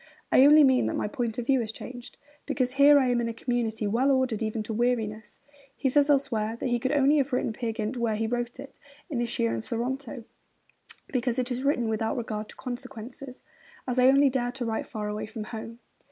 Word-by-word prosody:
I 260 - +7
only 300 +1 +8
mean 260 -2 +4
that - - -2
my - - -1
point 225 +1 -3
of 245 - -3
view 265 +1 +3
has 220 -2 -3
changed, 245 +2 -10 0.3
because 255 -2 0
here 280 +2 +6
I 260 -3 +3
am 240 -1 +2
in 230 - -1
a 230 - -6
community 230 -2 -2
well 235 +7 +2
ordered 260 -5 +1
even 215 0 -2
to 220 - -5
weariness.' 220 -2 -1 0.4
He 270 - +1
says 290 +2 +3
elsewhere 230 -6 +1
that 255 - -2
he 240 0 +1
could 260 +3 -1
only 290 0 +4
have 280 -1 +1
written 250 -3 0
Peer 230 +1 -3
Gynt 220 +2 -3
where 230 -2 0
he 225 +1 -1
wrote 240 +2 -3
it, 275 0 -11 0.3
at 245 -4 -1
Ischia 230 - 0
and 115 -1 -3
Sorrento, 250 +1 -4 0.9
because 245 -1 -1
it 255 0 -1
is 250 +1 -2
'written 275 -5 +1
without 220 +1 -1
regard 215 -2 -4
to - - -9
consequences 255 +1 -8 0.4
as 255 0 0
I 250 - +6
only 275 +1 +5
dare 245 -2 -1
to 255 -2 -4
write 220 -1 -2
far 215 -2 -5
away 210 0 -4
from 220 0 -6
home.' 225 +1 -8
245 Hz, 220 wpm, -27 LUFS, 225-265 Hz, 0.9 s, only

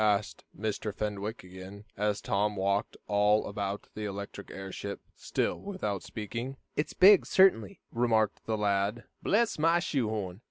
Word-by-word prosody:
asked 105 0 +1 0.2
Mr. 110 0 -2
Fenwick 105 +1 -4
again, 95 +3 -10
as 105 0 0
Tom 105 -2 0
walked 100 +2 0
all 105 +1 +3
about 100 0 -4
the 110 - -5
electric 100 0 -6
airship, 95 +1 -6 0.2
still - - -1
without 145 - -3
speaking. 115 +5 -5 0.2
"It's 150 - -1
big, 195 0 +8
certainly," 180 - +3
remarked 110 -3 +1
the 110 -1 0
lad. 100 +2 0 0.2
"Bless 220 -3 +2
my 165 +2 +4
shoe 135 -9 0
horn! 100 -4 -3
105 Hz, 145 wpm, -30 LUFS, 100-115 Hz, 0.2 s, big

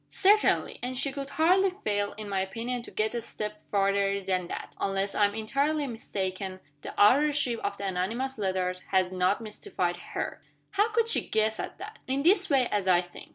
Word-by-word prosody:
"Certainly! 415 +2 +3
And 250 +1 -3
she 275 +2 0
could 275 0 -6
hardly 360 +7 +4
fail, 205 -1 0
in 210 0 -8
my 195 -1 0
opinion, 235 +6 -3
to - - -10
get 215 +1 -1
a 235 - -2
step 210 -2 -6
farther 200 0 +2
than 185 -2 -1
that. - - -7
Unless 195 0 0
I 205 - +4
am 205 +1 -1
entirely 280 +7 0
mistaken, 190 -5 -4 0.2
the - - -7
authorship 265 +2 +4
of 200 0 -3
the 200 - -5
anonymous 220 +8 -2
letters 185 -2 -1
has 185 -1 +2
not 185 +3 +1
mystified 180 -5 -3
her." - - -5 0.3
"How 410 +3 +2
could 460 +1 +2
she 460 - +2
guess 220 0 +1
at - - -5
that?" 425 +3 -9
"In 270 +2 0
this 375 +3 +4
way, 265 -4 +4
as 205 -2 -1
I 180 -1 +5
think. 175 -1 -12
215 Hz, 195 wpm, -28 LUFS, 195-275 Hz, 0.3 s, I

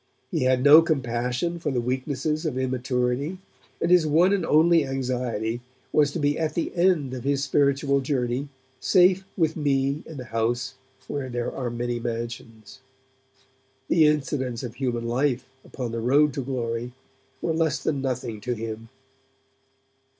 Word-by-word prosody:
He 160 -8 0
had 130 0 +2
no 150 +3 +9
compassion 130 +2 -1
for 160 - -2
the 130 -3 0
weaknesses 130 +5 -2
of 135 -4 -3
immaturity, 130 +4 -1 0.4
and 170 - 0
his 175 -3 +5
one 170 +6 +4
and 200 - +1
only 165 +1 +4
anxiety 125 -4 -2 0.3
was 145 -2 +4
to - - -2
be 145 0 +1
at 155 -2 -1
the 170 - -2
end 170 -7 +2
of 125 -2 -5
his 140 0 0
spiritual 140 0 +2
journey, 130 0 -1 0.3
safe 185 +1 +4
with 160 -3 +1
me 140 -1 0
in 160 - -9
the 125 - -6
house 120 +3 0 0.3
where 140 -3 -4
there 120 -1 -2
are 125 -3 -3
many 120 0 -3
mansions. 115 -1 -6 1.1
The 160 -3 +5
incidents 135 -5 -1
of 120 -3 -5
human 120 -3 -2
life 130 +1 0 0.2
upon 125 -4 -5
the 115 - -3
road 140 +4 +3
to 140 - -3
glory 120 -2 -3 0.5
were 165 - -1
less 160 -3 +1
than 145 -3 -2
nothing 125 -5 -3
to 125 - -2
him. 115 0 -6
135 Hz, 155 wpm, -25 LUFS, 120-150 Hz, 1.1 s, no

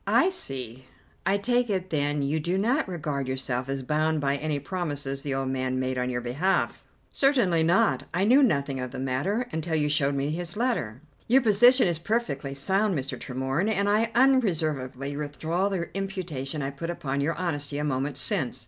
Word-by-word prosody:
"I - - +4
see. 130 - -3 0.4
I 195 +1 +3
take 245 +3 +1
it 185 -2 -2
then 145 -1 0
you 145 +3 0
do 175 +5 -1
not 240 +6 +1
regard 150 -6 -3
yourself 130 -1 -3
as 135 -1 -2
bound 155 +3 +1
by 140 -1 +1
any 150 0 -2
promises 145 -4 -4
the 140 -1 -2
old 135 -1 -1
man 130 -1 -1
made 130 0 -1
on 125 0 -1
your 120 -1 -2
behalf?" 145 +11 -1 0.2
"Certainly 240 - +3
not. 185 +7 +2
I 180 +3 0
knew 250 +7 +6
nothing 140 - +1
of 125 0 -3
the - - -8
matter 135 - -1
until 160 +1 -2
you 150 -1 +1
showed 140 -1 +1
me 140 +2 -1
his 175 +4 -5
letter." 180 - -1 0.3
"Your 260 +3 +5
position 240 +3 +6
is 170 -2 0
perfectly 155 - -2
sound, 190 +6 +1
Mr. 135 0 -3
Tremorne, 130 - -2
and 200 -2 +1
I 215 +2 +2
unreservedly 155 - +1
withdraw 160 +6 -1
the 185 -3 -4
imputation 170 -8 -4
I 135 - -2
put 155 +5 -6
upon 140 -5 -2
your 160 +4 0
honesty 145 -5 -3
a 150 - -1
moment 140 -1 -1
since. 130 -2 +1
150 Hz, 185 wpm, -26 LUFS, 135-195 Hz, 0.4 s, knew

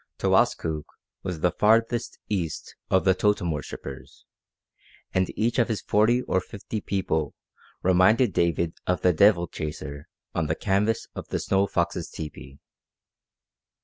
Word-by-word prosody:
Towaskook 80 -2 +1 0.4
was 90 -4 -5
the 90 - +3
"farthest 115 +4 +2
east" 90 -7 -3
of 95 - +3
the 95 - +6
totem 100 -3 +1
worshippers, 70 -2 -7 0.9
and 95 -1 +1
each 115 +3 +1
of 120 - +3
his 110 -5 -2
forty 120 +4 +3
or 95 - 0
fifty 100 +3 -6
people 80 -6 -1 0.5
reminded 95 +5 +4
David 85 -1 +1
of 90 - +1
the 90 - +4
devil 90 0 +5
chaser 75 -3 -6 0.3
on 80 - 0
the 80 - 0
canvas 105 +5 0
of - - -7
the - - -2
Snow 100 0 +1
Fox's 85 -2 -1
tepee. 70 -3 -8
95 Hz, 135 wpm, -26 LUFS, 80-105 Hz, 0.9 s, the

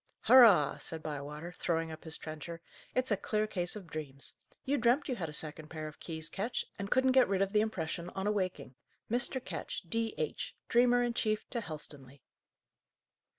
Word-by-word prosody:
"Hurrah!" 215 - +7
said 160 -1 -5
Bywater, 150 +2 -5
throwing 165 -2 -1
up 160 +1 -9
his 160 0 -2
trencher. 155 +2 -7 0.4
"It's 255 -1 +1
a - - +5
clear 215 +2 0
case 180 -4 -2
of 205 -3 -7
dreams. 150 -4 -6 0.3
You 280 +1 +1
dreamt 240 +5 +3
you 255 - -1
had 165 -5 -3
a - - -6
second 155 0 -2
pair 155 0 -5
of 155 - -10
keys, 160 -1 -5
Ketch, 210 +8 -2
and 200 0 -3
couldn't 260 +2 +4
get 260 -1 +6
rid 195 0 +3
of 195 +1 -3
the 210 - +5
impression 175 -5 -2
on 190 0 -2
awaking. 190 -9 -1 0.4
Mr. 245 +2 +1
Ketch, - - -4
D.H., 225 -6 -2
Dreamer 245 0 +5
in 240 -1 0
chief 215 -2 0
to 235 - -1
Helstonleigh!" 145 - -8
185 Hz, 180 wpm, -33 LUFS, 155-230 Hz, 0.4 s, Hurrah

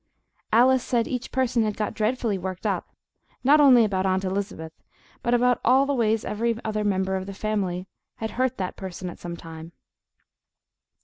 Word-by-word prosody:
Alice 255 +3 +5
said 235 -3 0
each 250 -1 -4
person 255 -2 +1
had 215 -2 -1
got 210 - -2
dreadfully 220 0 0
worked 185 0 -5
up, - - -1 0.6
not 290 +4 +6
only 250 -5 +7
about 190 -3 -1
Aunt 190 0 +1
Elizabeth, 190 -4 -3 0.5
but 240 0 +2
about 245 0 +2
all 260 +3 +5
the 285 - 0
ways 225 -4 +1
every 230 +2 -1
other 215 -1 -1
member 190 -2 0
of 190 0 -4
the 195 - -7
family 190 -4 -2 0.3
had 220 -1 -4
hurt 255 +1 -1
that 185 -2 -3
person 185 -1 -6
at - - -13
some 170 -1 -6
time. 165 0 -10
215 Hz, 175 wpm, -25 LUFS, 190-245 Hz, 0.6 s, only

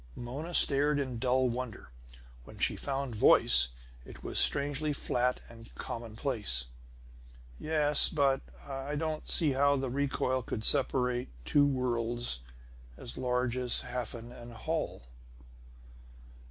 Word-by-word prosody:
Mona 140 +8 -6
stared 145 +1 +4
in 130 -4 -4
dull 130 +1 +1
wonder. 120 - -6 0.5
When - - -14
she - - 0
found 135 -2 -4
voice 60 - +6 0.4
it - - -13
was - - 0
strangely 145 +1 +5
flat 125 -2 -1
and 115 0 -15
commonplace. 110 - -2 0.9
"Yes, 150 -2 +3
but 140 -3 +1 0.3
I 135 +1 -5
don't 155 0 -4
see 155 -5 +2
how 140 +1 +2
the 135 -2 -3
recoil 130 -1 -1
could 110 -2 -6
separate 125 -2 +1 0.2
two 145 - +3
worlds 120 - -2 0.6
as 120 - -10
large 125 -1 -1
as 125 -1 -3
Hafen 120 -1 -7
and 120 -1 -12
Holl!" 110 - -4
130 Hz, 120 wpm, -30 LUFS, 120-140 Hz, 0.9 s, voice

